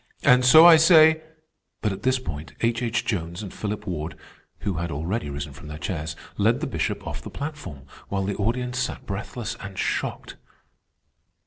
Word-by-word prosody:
And 125 0 +6
so 155 +7 +9
I 170 -2 +10
say—" 160 -1 +6 0.6
But 105 - +1
at 95 - -8
this 130 0 +2
point 80 - -7
H. 115 0 +1
H. 120 0 -1
Jones 85 -1 -3
and 100 - -8
Philip 105 0 -4
Ward, 85 -4 -4 0.4
who 100 -5 -2
had 85 +1 -2
already 80 +5 -3
risen 70 0 -5
from 75 +3 -12
their 75 0 -7
chairs, 80 -3 -4 0.2
led - - +3
the - - -2
Bishop - - -2
off - - -5
the - - -8
platform, 145 - -7 0.3
while 95 -1 -1
the 100 0 -2
audience 125 +4 -1
sat 125 - -3
breathless 110 +3 -5
and 100 -2 -8
shocked. - - -3
105 Hz, 180 wpm, -24 LUFS, 85-125 Hz, 0.6 s, I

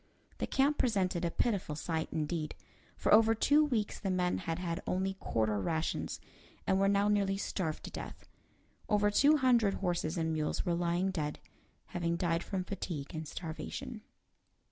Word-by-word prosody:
The - - -1
camp 280 +2 +2
presented 190 -7 +1
a 170 - +2
pitiful 195 -6 -1
sight, 160 +1 -2
indeed. 155 0 -2 0.4
For - - +2
over 225 +1 +6
two 290 +7 +4
weeks 235 -8 -1
the 195 - -2
men 180 -1 +1
had 165 -2 -3
had 170 -2 -3
only 190 +1 0
quarter 110 -2 0
rations, 160 - -1 0.5
and 190 0 +2
were 195 - +4
now 200 +1 +3
nearly 200 -2 +2
starved 175 -5 -3
to - - -7
death. - - -8 0.6
Over 205 0 +3
two 290 +8 +5
hundred 240 -7 +3
horses 175 -2 -1
and 160 -1 0
mules 155 -1 -1
were 175 - +1
lying 175 +2 +1
dead, 150 -5 -2 0.5
having 170 -1 -1
died 170 -1 +1
from 190 0 -3
fatigue 175 -7 -5
and 160 -1 -4
starvation. 215 - -6
185 Hz, 165 wpm, -33 LUFS, 165-205 Hz, 0.6 s, over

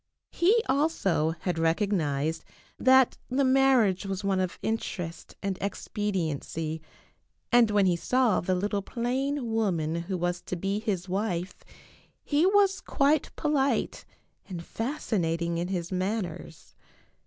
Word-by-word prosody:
He 430 +7 +3
also 230 - +1
had 175 -3 -1
recognized 160 -3 0 0.4
that 260 -1 +5
the 265 +2 +1
marriage 260 -8 +4
was 195 0 -4
one 195 -1 +1
of 185 -2 -2
interest 180 -6 -4
and 195 -2 -2
expediency, 165 -6 -3 0.7
and 240 -2 +6
when 205 -2 +3
he 180 -2 +3
saw 250 +4 +2
the 185 +2 0
little 200 +2 -1
plain 250 +3 -2
woman 175 -8 0
who 170 +3 -3
was 175 0 -1
to - - -5
be 195 +4 -1
his 200 -5 -2
wife 185 -2 -3 0.6
he 300 +4 +2
was 390 -1 +3
quite 285 +1 +2
polite 285 -2 0 0.5
and 175 -3 -5
fasci 230 - -2
nating 170 0 -1
in 175 - -2
his 180 -2 -3
manners. 185 -4 -4
195 Hz, 130 wpm, -28 LUFS, 175-255 Hz, 0.7 s, and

